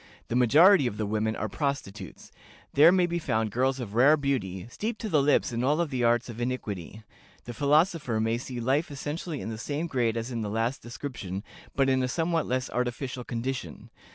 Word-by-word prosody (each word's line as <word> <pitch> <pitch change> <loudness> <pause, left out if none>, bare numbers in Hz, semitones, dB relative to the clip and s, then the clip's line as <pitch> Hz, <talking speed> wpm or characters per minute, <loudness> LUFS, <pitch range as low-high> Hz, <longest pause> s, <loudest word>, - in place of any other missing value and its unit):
The 120 - -1
majority 145 - +6
of 105 - -4
the 110 - -1
women 110 +1 -1
are 110 - -2
prostitutes: 135 -5 -5 0.4
there 155 +4 +7
may 185 -1 +3
be 170 0 -2
found 110 -8 -1
girls 130 +4 +1
of 110 -5 -6
rare 135 +7 +5
beauty, 105 -11 -2
steeped 215 - -4
to 220 - -3
the 155 -6 +3
lips 145 -2 +2
in 120 +1 -2
all 150 +6 +2
the 130 -5 -2
arts 120 0 +2
of 120 -1 -7
iniquity. 110 -5 -4 0.4
The 120 - -7
philosopher 150 - +2
may 115 +1 0
see 125 0 -6
life 135 +7 +1
essentially 150 +2 -5
in - - -5
the 110 -1 -6
same 145 +7 -3
grade 120 -8 0
as 115 +3 -4
in 115 -2 -3
the 105 - -3
last 115 +5 -1
description, 120 -6 -6 0.3
but 135 -1 +3
in 130 -1 +2
a 130 - 0
somewhat 165 +4 0
less 130 +1 -1
artificial 125 +1 -3
condition. 120 - -5
125 Hz, 200 wpm, -27 LUFS, 115-145 Hz, 0.4 s, there